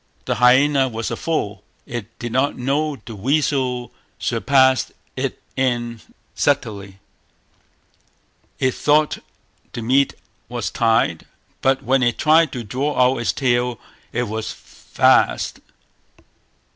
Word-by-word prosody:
The - - -1
hyaena 135 +2 +5
was 115 -1 -4
a - - -1
fool, 105 -12 -3 0.2
it 115 -2 -7
did 120 -1 -5
not 130 +4 +1
know 145 +4 0
the 115 -4 -11
weasel 130 +1 0 0.3
surpassed 130 +1 +2 0.2
it - - -3 0.2
in 120 -3 -1 0.3
subtlety; 105 -9 -1 1.6
it 130 -1 +1
thought 150 +1 +2 0.5
the 120 -2 -5
meat 135 +4 +2 0.3
was - - -3
tied; 115 -7 +1 0.3
but 135 0 +2
when 135 +1 +2
it 120 -2 +1
tried 155 -1 +4
to 120 - -4
draw 130 +7 -2
out 125 0 +4
its 120 - +1
tail, 120 -3 0 0.3
it 120 - -1
was 110 -1 -4
fast. - - +1
125 Hz, 120 wpm, -21 LUFS, 115-140 Hz, 1.6 s, hyaena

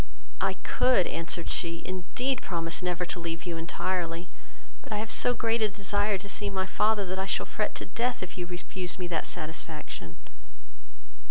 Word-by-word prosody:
"I - - +3
could, 250 -8 +5
(answered 165 0 -1
she), 170 -1 -1
indeed 230 +8 0
promise 165 -2 -1
never 180 -1 0
to 175 - -3
leave 165 0 -3
you 175 -2 -2
entirely, 170 +1 -1 0.5
but - - -12
I 210 - +1
have 215 +1 -1
so 245 - +5
great 230 0 +2
a 215 - +5
desire 205 +1 +1
to 200 +2 -9
see 200 0 -1
my 190 -1 0
father, 210 +1 +3
that 185 +1 -2
I 190 - 0
shall - - +1
fret 210 - -1
to - - -3
death, 235 +2 0
if 185 - -6
you 180 -1 -3
refuse 180 0 -2
me 180 - -2
that 165 -2 +1
satisfaction." 155 - -3
185 Hz, 180 wpm, -30 LUFS, 170-205 Hz, 0.5 s, could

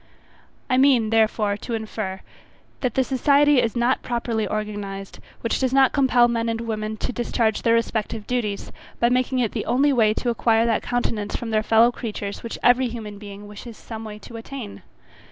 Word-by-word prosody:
I 255 - +2
mean, 255 -5 +4
therefore, 215 -2 +2
to 230 +2 -4
infer, 215 -3 -4 0.6
that 250 -4 -2
the 265 - +3
society 280 +1 +4
is 230 - -1
not 240 +2 +1
properly 235 -3 -2
organized 205 -2 -5 0.2
which 230 - -1
does 260 -1 0
not 270 -1 +5
compel 255 -3 +4
men 230 -1 -1
and 225 0 -2
women 215 -1 -3
to 250 - -3
discharge 230 -2 0
their 230 -1 +3
respective 225 -2 -2
duties, 215 -5 -2 0.3
by 235 - +3
making 255 +1 +1
it 240 -4 +1
the - - -4
only 275 +4 +3
way 220 -4 +3
to 240 - 0
acquire 230 0 +2
that 230 -2 +1
countenance 225 -4 -2
from 230 -1 -4
their 215 0 +2
fellow 225 +2 +4
creatures, 210 -4 -5
which 230 - -6
every 245 +1 +5
human 215 -4 -7
being 205 0 -10
wishes 210 +2 -10
some 225 -1 -8
way 215 -1 -7
to 230 +2 -10
attain. 230 -2 -8
230 Hz, 185 wpm, -23 LUFS, 215-245 Hz, 0.6 s, not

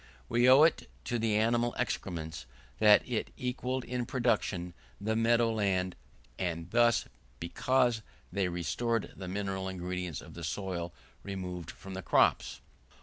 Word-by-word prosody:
We 120 - +4
owe 135 +4 +8
it 160 - +2 0.2
to 120 -1 -1
the 110 -1 +1
animal 120 +2 +2
excrements, 80 - -3 0.3
that 105 -1 +6
it 120 -3 -2
equalled 125 0 -2
in 125 -1 -3
production 105 -8 0 0.3
the 110 +2 -1
meadow 115 0 +3
land, 95 -4 0 0.4
and 85 -1 -3
this, 120 0 +4 0.3
because 120 +6 +1 0.3
they 100 -2 +1
restored 100 +7 -1
the 95 - -7
mineral 95 0 -2
ingredients 90 -4 -4
of - - -12
the 85 - -8
soil 85 +2 -3 0.3
removed 90 -4 -5
by 95 - -7
the 95 - -4
crops. - - +2
100 Hz, 140 wpm, -31 LUFS, 90-120 Hz, 0.4 s, owe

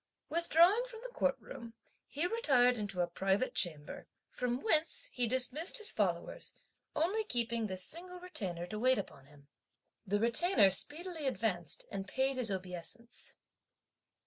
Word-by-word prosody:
Withdrawing 340 +6 +4
from 465 -3 -10
the - - -8
Court 270 -1 +1
room, 230 0 -10 0.3
he 300 +5 -2
retired 270 - +4
into 205 -5 -2
a 175 - +1
private 195 +7 0
chamber, 155 -5 +1 0.2
from 250 0 -2
whence 335 +5 +1
he 245 -2 0
dismissed 260 - +1
his 435 -1 +4
followers, - - -2 0.4
only 385 +8 +1
keeping 235 - -1
this 185 -1 -3
single 360 +2 -6
Retainer 190 - -4
to 210 +4 -6
wait 255 +2 +4
upon 135 -8 -7
him. 145 -1 -19 0.6
The 205 +2 +1
Retainer 235 - +4
speedily 315 - -3
advanced 190 - -1
and 195 -1 -4
paid 265 +5 0
his 245 -3 +2
obeisance. 190 +5 -5
245 Hz, 145 wpm, -34 LUFS, -, 0.6 s, Withdrawing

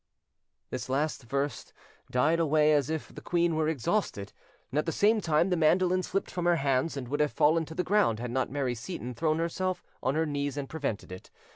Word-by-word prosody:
This 130 0 -4
last 145 +4 0
verse 140 +4 -3 0.4
died 155 +7 +2
away 155 -1 +4
as 145 -2 +2
if 160 -1 -4
the - - -9
queen 170 -1 +1
were 155 -1 +1
exhausted, 135 - -1 0.4
and 145 - +1
at 155 - -2
the - - +1
same 215 +5 +3
time 165 +2 +2
the - - +3
mandolin 180 +3 +3
slipped 195 +2 -2
from 175 -1 -3
her 175 0 +4
hands, 140 0 0
and 130 -3 -5
would 145 +2 -1
have 150 -1 +2
fallen 160 +2 +3
to 160 - -10
the 180 - 0
ground 200 - +2
had 120 +1 -5
not 130 +1 0
Mary 135 -3 -1
Seyton 125 +1 -6
thrown 155 +5 0
herself 180 +3 -2 0.2
on 130 - 0
her 160 +1 +2
knees 145 -2 -2
and 140 -1 -3
prevented 140 -12 -4
it. 90 - -9
155 Hz, 215 wpm, -29 LUFS, 135-170 Hz, 0.4 s, away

